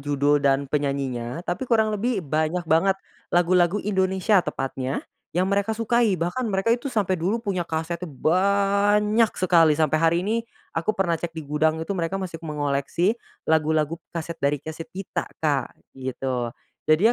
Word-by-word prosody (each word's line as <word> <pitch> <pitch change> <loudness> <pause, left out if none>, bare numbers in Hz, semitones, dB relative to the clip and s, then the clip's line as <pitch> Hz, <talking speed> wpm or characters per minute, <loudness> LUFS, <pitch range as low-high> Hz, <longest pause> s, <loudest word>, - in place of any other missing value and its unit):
judul 145 +1 +2
dan 140 0 +2
penyanyinya, 140 0 -2
tapi 185 +9 -3
kurang 220 -2 +3
lebih 210 -2 -1
banyak 155 +4 0
banget, 165 +5 +3 0.3
lagu-lagu 175 +1 +3
Indonesia 190 0 +2
tepatnya 135 -4 -3 0.3
yang 180 - +3
mereka 200 +2 +1
sukai, 230 -2 +2
bahkan 180 +9 -1
mereka 195 +3 +2
itu 245 +4 -1
sampai 210 -7 0
dulu 190 +7 +1
punya 195 -4 -1
kasetnya 170 +1 -3
banyak 200 - +3
sekali, 165 -4 +4
sampai 155 0 +2
hari 165 0 +4
ini 215 +3 +1 0.4
aku 170 +6 -1
pernah 185 -3 +1
cek 165 -1 -5
di 160 - -5
gudang 155 +2 +1
itu 160 +5 -3
mereka 175 0 -2
masih 180 -4 -5
mengoleksi 150 +4 0 0.3
lagu-lagu 160 +1 +1
kaset 165 0 -6
dari 140 +1 +2
kaset 160 +3 -8
kita 195 0 -4 0.2
Kak, 140 -5 0 0.2
gitu, 130 -2 -3 0.4
jadi 185 +10 +5
170 Hz, 150 wpm, -24 LUFS, 150-200 Hz, 0.4 s, jadi